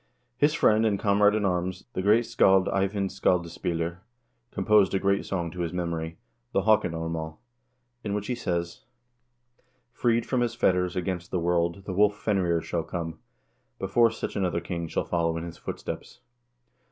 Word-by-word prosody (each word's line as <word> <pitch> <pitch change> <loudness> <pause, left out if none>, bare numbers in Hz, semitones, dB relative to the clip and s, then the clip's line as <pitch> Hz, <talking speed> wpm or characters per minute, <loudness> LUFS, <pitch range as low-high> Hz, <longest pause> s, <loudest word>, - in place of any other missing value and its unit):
His 145 +4 +3
friend 110 -8 +4
and 105 -3 +2
comrade 105 0 +4
in 105 -2 0
arms, 90 0 -1
the 95 - -2
great 110 +5 +4
scald 95 -3 +4
Eyvind 100 0 0
Skaldaspiller, 85 -2 -1 0.5
composed 105 -5 +3
a - - +2
great 100 +1 +1
song 85 -4 -2
to 90 - -9
his 85 -2 -1
memory, 85 -2 -3 0.4
the - - +2
"Haakon 110 -5 +3
armaal," 80 -1 -4 0.7
in 100 -1 -2
which 105 -1 -3
he 125 - -1
says: 85 -6 -3 1.1
Freed 120 -1 +1
from 130 -2 0
his 120 -1 0
fetters, 90 -4 +1
against 90 -1 -3
the 90 - -1
world 85 +1 0
the 95 - -4
wolf 105 +2 +3
Fenrir 90 -6 +1
shall 85 - -2
come,1 80 -2 -5 0.6
before 115 +5 +3
such 115 - -5
another 90 -4 0
king 85 0 -4
shall - - -2
follow 85 -1 0
in 80 - -4
his 85 0 -8
footsteps. - - -7
95 Hz, 165 wpm, -27 LUFS, 85-105 Hz, 1.1 s, friend